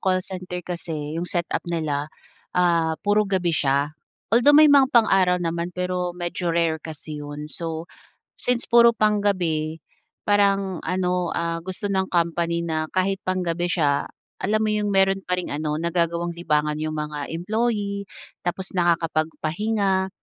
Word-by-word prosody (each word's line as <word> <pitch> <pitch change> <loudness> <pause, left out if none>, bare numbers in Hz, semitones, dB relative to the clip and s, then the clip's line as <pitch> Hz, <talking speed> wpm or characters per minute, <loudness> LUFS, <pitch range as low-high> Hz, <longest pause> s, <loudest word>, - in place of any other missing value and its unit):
call 185 0 +1
center 180 -2 -6
kasi, 160 -4 -5
'yong 175 - -4
setup 175 -2 -1
nila, 150 -4 -1 0.5
ah, 165 -3 +2
puro 205 0 +3
gabi 180 -3 +1
siya, 140 0 +1 0.4
although 265 +6 +6
may 305 -1 +8
mga 275 -2 +6
pang-araw 195 -7 +4
naman, 170 -1 -2
pero 180 -1 -2
medyo 175 0 -3
rare 165 -1 +1
kasi 155 -1 -8
'yon. 145 0 -6
So, 165 -1 -4 0.6
since 245 -1 0
puro 235 0 +7
pang-gabi, 180 -8 +1 0.4
parang 200 -3 +2
ano, 180 0 0
ah, 165 0 -1
gusto 190 +2 -3
ng 190 -1 0
company 170 0 0
na 155 -1 -2
kahit 190 +1 0
pang-gabi 175 -2 -1
siya, 145 -5 +1 0.3
alam 215 +2 +1
mo 215 - +1
'yong 210 -1 0
meron 195 0 +4
pa 180 - +1
ring 180 - -4
ano, 150 0 -2
nagagawang 170 0 0
libangan 150 -3 0
'yong 155 0 -2
mga 150 -1 -4
employee. 205 +2 -1 0.4
Tapos 185 +2 -2
nakakapagpahinga, 175 +4 0
175 Hz, 140 wpm, -23 LUFS, 160-195 Hz, 0.6 s, may